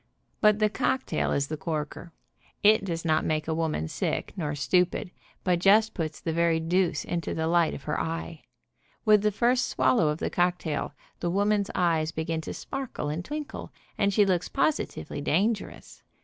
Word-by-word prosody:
But 210 -1 +5
the 215 0 +3
cocktail 260 +5 -1
is 140 - +1
the 155 +2 -5
corker. 160 0 -4 0.5
It 215 0 +6
does 170 -3 -3
not 155 -1 +2
make 155 -1 -1
a 160 - 0
woman 160 - -1
sick, - - -2
nor 150 -4 -2
stupid, 180 +4 +1 0.3
but 180 -2 +2
just 210 +4 +5
puts 160 -3 -4
the 165 - -3
very 170 0 +2
deuce 165 -2 0
into 170 -1 -3
the 160 - -1
light 170 0 +2
of - - -9
her 150 - -2
eye. 165 -1 -4 0.6
With 210 -2 +6
the 210 - +3
first 245 +4 +2
swallow 130 +4 +2
of 150 0 0
the - - -3
cocktail 175 -4 -1 0.2
the 175 - -1
woman's 205 +2 +1
eyes 165 -3 +1
begin 160 0 -2
to - - -6
sparkle 265 - -5
and 155 +4 -3
twinkle, 300 +6 -6 0.2
and 200 -1 +2
she 205 +1 +4
looks 180 -2 0
positively 285 - -1
dangerous. 200 +9 -1
170 Hz, 175 wpm, -27 LUFS, 160-200 Hz, 0.6 s, It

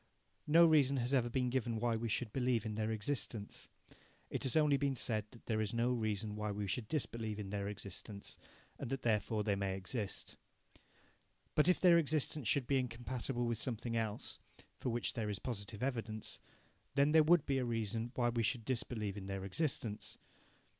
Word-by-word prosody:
No 165 +3 +8
reason 145 -4 +5
has 125 +2 -1
ever 120 -3 +3
been 125 0 0
given 120 -3 0
why 120 0 +1
we 115 +1 -2
should 110 0 -1
believe 125 -4 +1
in 110 - -2
their 110 +1 -1
existence. 110 -1 -3 0.6
It - - -2
has 130 +3 +2
only 150 -2 +5
been 140 -1 +1
said 110 -3 +1
that 115 - -16
there 110 -2 0
is 110 +1 -1
no 120 +2 +2
reason 110 -3 -1
why 105 0 -2
we 105 0 -2
should 105 +3 -2
disbelieve 115 -6 -2
in 100 -2 -5
their 100 -1 -2
existence, 100 0 -6 0.4
and - - -4
that 135 0 -3
therefore 105 -1 +1
they 105 -1 +1
may 95 -1 -1
exist. 100 +1 -4 1.2
But 150 +4 +4
if 180 - +4
their 175 -2 +7
existence 150 -4 0
should 135 +4 +3
be 135 +2 +2
incompatible 120 0 -2
with 115 -2 -1
something 115 -1 -2
else, 110 -2 -2 0.4
for - - -1
which 120 0 0
there 110 -2 -2
is 105 - -2
positive 105 -1 -5
evidence, 115 -5 -3 0.6
then 140 +1 +4
there 160 0 +7
would 160 0 +5
be 135 -2 +1
a - - 0
reason 115 0 -2
why 120 -1 +2
we 120 -1 0
should 115 +1 0
disbelieve 110 -5 -2
in 95 -1 -6
their 95 -1 -3
existence. 115 - -2
115 Hz, 190 wpm, -36 LUFS, 105-130 Hz, 1.2 s, No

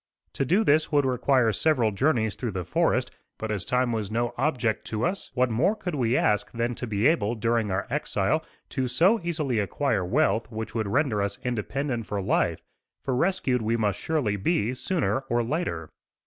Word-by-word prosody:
To 135 - -1
do 185 - +3
this 155 -3 +3
would 145 -2 +3
require 125 -2 +2
several 125 -3 +2
journeys 110 -1 +1
through 120 -5 -4
the 90 -2 -3
forest; - - +1 0.3
but 110 0 -4
as 100 -3 -2
time 125 -1 +1
was 110 -4 -2
no 120 +2 -1
object 125 -8 0
to 110 +1 -2
us, 190 +3 -2
what 125 -1 +2
more 150 - +2
could 180 -5 -5
we 125 -3 +1
ask 105 0 +1
than 120 +1 -1
to 120 - -5
be 105 +1 -1
able, 120 -8 +3
during 115 -1 0
our 95 +1 -1
exile, - - 0 0.3
to 130 -1 -1
so 190 - +3
easily 155 -9 -1
acquire 105 0 0
wealth 115 - +1
which 110 0 -5
would 110 -2 -1
render 125 -2 +1
us 100 0 -2
independent 125 0 -2
for 105 - -2
life; 95 - 0 0.4
for 135 - -1
rescued 135 -5 +1
we 115 +1 0
must 105 -3 0
surely 135 -11 0
be, 120 - 0
sooner 160 +1 0
or 120 0 +2
later. 115 - -3
120 Hz, 190 wpm, -26 LUFS, 110-145 Hz, 0.4 s, do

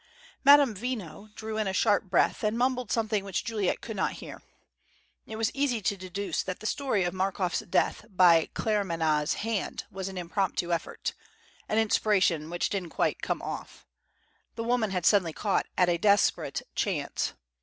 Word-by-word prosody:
Madame 285 -3 +7
Veno 210 -4 -5
drew 220 0 -4
in 215 - 0
a 190 - -1
sharp 205 +2 +2
breath, 180 +3 +1
and 215 +2 +1
mumbled 250 -2 0
something 215 -3 0
which 195 +1 -2
Juliet 220 -5 -1
could 225 - -6
not 190 - 0
hear. - - -9 0.9
It 220 - -6
was 225 -1 0
easy 275 -4 0
to 200 0 0
deduce 190 +1 -3
that 185 -1 -5
the 215 - -11
story 255 -5 0
of 175 - -1
Markoff's 190 -1 -1
death 175 - 0
by 175 -4 +5
Claremanagh's 165 -8 +1
hand 225 -4 -2
was 190 -1 -5
an 190 - -8
impromptu 175 0 -1
effort 170 - -3 0.6
an 215 - +1
inspiration 195 -7 +2
which 175 +1 -1
didn't 190 -4 -3
quite - - -1
"come - - -2
off!" - - -7 0.7
The 230 - -3
woman 235 -2 +1
had 180 -3 -2
suddenly 175 -3 +4
caught 200 +3 0
at 180 - +4
a 170 -1 +1
desperate 205 +2 +2
chance. - - -1
200 Hz, 165 wpm, -28 LUFS, 180-220 Hz, 0.9 s, Madame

